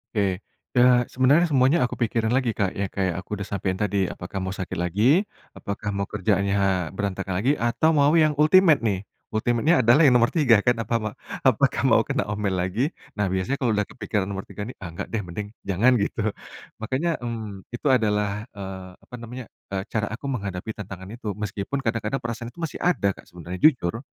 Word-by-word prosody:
Oke. 95 -3 +1 0.4
Ya, 125 0 +6
sebenarnya 145 +7 +4
semuanya 135 +4 +4
aku 125 - -1
pikirin 115 -1 0
lagi 125 -2 +1
Kak, 100 -3 0
ya 100 - 0
kayak 95 -3 0
aku 95 - -7
udah 100 0 -6
sampein 95 -1 -1
tadi, 100 -2 +1
"Apakah 90 +3 -7
mau 95 0 -3
sakit 95 -3 -5
lagi? 110 - +3 0.3
Apakah 100 +1 -4
mau 100 0 -2
kerjaannya 95 -3 0
berantakan 100 -1 -3
lagi? 130 +6 +3
Atau 120 +7 +2
mau 145 +1 +4
yang 155 -2 +5
ultimate, 160 0 +6
nih?" 100 -3 0 0.3
Ultimate-nya 120 +9 +2
adalah 125 +8 +6
yang 125 - +5
nomor 120 0 +4
3 125 -10 +4
kan, 120 -2 +3
apa, 115 +1 -3
ma 110 -1 -3 0.3
"Apakah - - +3
mau - - +5
kena - - 0
omel 105 -2 -1
lagi?" 95 +9 0 0.3
Nah, 105 - +2
biasanya 95 +9 -1
kalau 120 -4 +1
udah 105 - +2
kepikiran 105 -3 -2
nomor 95 -1 -5
3 105 - -6
nih, - - -10
"Ah, 85 -4 -8
enggak - - -5
deh, 115 - -1
mending 95 +4 -5 0.2
jangan." 100 +7 +4
Gitu. 100 +3 -1 0.6
Makannya, 130 +10 -1
mmm, 110 -5 -6
itu 120 +5 -3
adalah, 105 -3 +1
eee, 95 -2 -7
apa 125 - -11
namanya, 120 +2 -8 0.3
eee, 95 -1 -1
cara 105 -2 0
aku 120 - -8
menghadapi 100 -3 -4
tantangan 95 -2 -8
itu. 110 -3 -5
Meskipun 105 +6 -3
kadang-kadang 115 +2 -1
perasaan 115 0 -4
itu 170 - -11
masih 160 - -4
ada 175 - +2
Kak, - - -14
sebenarnya, 90 +1 -8
jujur. 115 - +3
105 Hz, 190 wpm, -24 LUFS, 100-125 Hz, 0.6 s, Ya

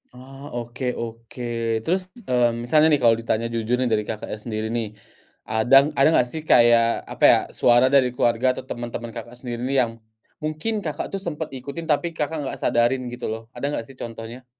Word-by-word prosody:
Oh, 135 -1 -7
oke 125 0 -3
oke, 115 +1 -7 0.4
terus, 185 +5 -1 0.2
mmm, 120 -5 +1
misalnya 150 +6 +4
nih - - -2
kalau 115 -1 +6
ditanya 115 0 -1
jujur 115 +1 0
nih 130 -1 +1
dari 105 -1 +2
Kakak 105 0 -5
sendiri 110 0 -4
nih, 115 -3 -3 0.6
ada 110 +4 +4 0.2
ada 135 - +6
gak 125 - +3
sih 160 - -5
kayak 115 -1 +5
apa - - -5
ya, - - +6 0.2
suara 120 +1 +5
dari 135 -3 +5
keluarga 120 +1 +2
atau - - -6
temen-temen 120 -1 -5
Kakak 120 +1 -9
sendiri 120 -2 -5
nih 135 - -1
yang 115 - -3 0.5
mungkin 155 +8 -3
Kakak 155 - -4
tuh 195 - -3
sempet 160 -5 -5
ikutin, 140 +6 -6
tapi 150 +4 +1
Kakak 155 +1 -2
gak 135 - -5
sadarin 120 +2 +2
gitu 120 - -6
loh, 110 +1 -4
ada 140 - -5
gak - - -3
sih 135 - -14
contohnya? 115 +2 -8
120 Hz, 190 wpm, -23 LUFS, 115-140 Hz, 0.6 s, kalau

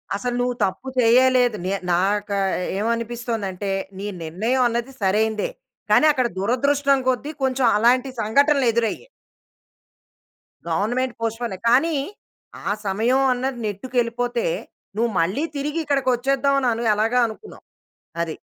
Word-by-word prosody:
అసలు 245 +4 -2
నువ్వు 245 0 -1
తప్పు 195 +7 -5
చేయలేదు. 245 0 +4
నే 190 - 0 0.2
నాకు 200 +3 0 0.4
ఏమనిపిస్తుందంటే, 225 -3 -2 0.3
నీ 200 +2 -5 0.2
నిర్ణయం 220 +11 0
అనేది 240 +3 -3
సరైనదే. 215 +2 +1 0.4
కానీ 255 +9 +6
అక్కడ 255 -4 +1
దురదృష్టం 275 +6 +2
కొద్ది 270 +4 -1
కొంచెం, 260 -1 +1
అలాంటి 250 +4 +3
సంఘటనలు 280 +5 +3
ఎదురయ్యాయి. 235 - -1 1.6
గవర్నమెంట్ 235 +9 0
పోస్ట్‌‌పోనే 225 -3 -3
కానీ, 300 +6 +3 0.7
ఆ - - +1 0.2
సమయం 235 +7 +2
అన్నది 255 0 -3
నెట్టుకేళ్ళిపోతే, 245 - -2 0.5
నువ్వు 230 0 +1
మళ్ళీ 195 - 0
తిరిగి 295 +3 -2
ఇక్కడికి 275 -2 +1
వచ్చేద్దాం. 275 +2 +1
అను 255 - 0
అని 230 0 -1
ఎలాగ 220 +3 0
అనుకున్నావ్. 225 - -11 0.6
అది. 160 -2 -4
240 Hz, 115 wpm, -22 LUFS, 215-260 Hz, 1.6 s, కానీ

